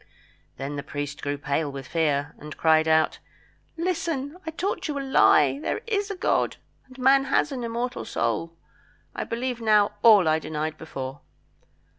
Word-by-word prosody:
Then 140 +2 -5
the - - -2
priest 145 0 -5
grew 145 0 -2
pale 145 +1 -1
with 135 -1 -7
fear, 145 -1 0
and 150 0 -9
cried 160 0 +4
out 160 0 +2 0.6
"Listen! 330 -4 -2
I - - 0
taught 355 +5 -3
you 295 -2 -3
a - - -2
lie. 150 - +4
There 430 - -2
is 410 -3 -1
a 400 - -3
God, 365 - 0 0.3
and 260 0 -16
man 270 +1 +4
has 275 +2 +1
an 255 -3 -4
immortal 235 +2 -3
soul. 115 +9 -2 0.6
I - - -3
believe 240 +1 -3
now 210 -2 +4
all 210 -7 +7
I 155 0 +3
denied 155 0 -3
before." 135 -3 -7
165 Hz, 165 wpm, -25 LUFS, -, 0.6 s, all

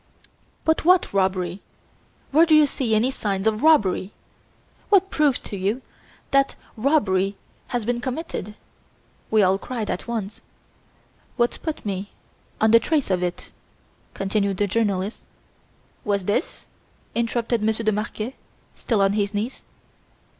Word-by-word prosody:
"But 320 0 +2
what 360 - +4
robbery? 185 -1 0 0.7
Where 320 +4 +5
do 315 - +6
you 305 -1 +7
see 250 -5 0
any 235 +5 +2
signs 200 -6 -2
of 220 0 +1
robbery? 210 -11 +3 0.8
What 390 -1 +4
proves 295 -4 +2
to - - -7
you 200 +7 -1 0.5
that 275 0 +3 0.2
a 220 - -11
robbery 200 -9 +2 0.3
has 240 -4 -2
been 240 +1 -1
committed?" 255 - -4 0.7
we 215 -1 +4
all 190 +1 +3
cried 230 -3 -4
at 180 - -4
once. 215 -4 -4 1.0
"What 240 -1 +1
put 315 -7 -4
me 200 0 -3 0.5
on 220 0 +4
the 230 - +8
trace 295 -5 0
of 180 -1 +1
it," 180 -1 -4 0.6
continued 195 0 0
the 205 - +2
journalist... 200 -1 -1 0.8
"Was 200 -3 0
this?" 205 - -2 0.5
interrupted 235 0 0
Monsieur 220 +1 0
de 215 - +4
Marquet, 215 +3 -3 0.4
still 215 -5 +1
on 195 0 +3
his 205 0 -1
knees. 220 +5 -3
215 Hz, 140 wpm, -23 LUFS, 195-255 Hz, 1.0 s, the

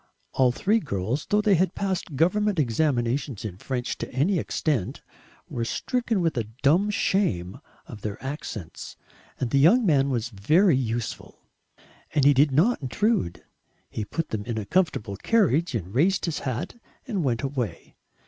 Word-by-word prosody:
All 130 -2 +3
three 210 - +1
girls, 125 - -3
though 210 +1 +3
they 210 -1 +3
had 185 +1 +2
passed 190 -6 -2
government 200 +6 +2
examinations 125 -3 0
in 95 -3 -6
French 125 0 -3
to - - -5
any 160 +9 +1
extent, 140 - -2 0.4
were 120 - -3
stricken 230 - -1
with 165 -2 0
a 115 - 0 0.2
dumb 175 +9 +4
shame 185 - 0 0.3
of 105 - -10
their 105 -1 -4
accents, 110 - -6 0.4
and 125 -3 -2
the 140 - +3
young 215 - +5
man 140 -6 +3
was 120 -2 -1
very 155 - +3
useful. 120 -3 -4 0.7
And 145 -3 +3
he 145 - +7
did 140 +2 +4
not 175 - +3
intrude. 130 - 0 0.5
He 110 - -3
put 165 +9 -4
them 110 -2 -3
in 115 -2 -3
a 105 - -3
comfortable 135 - 0
carriage 170 - +2
and 95 -3 -4
raised 185 +9 +2
his 165 -4 -2
hat 130 - -4 0.3
and 200 -8 -1
went 120 -3 0
away. 125 -10 -4
140 Hz, 160 wpm, -25 LUFS, 115-185 Hz, 0.7 s, he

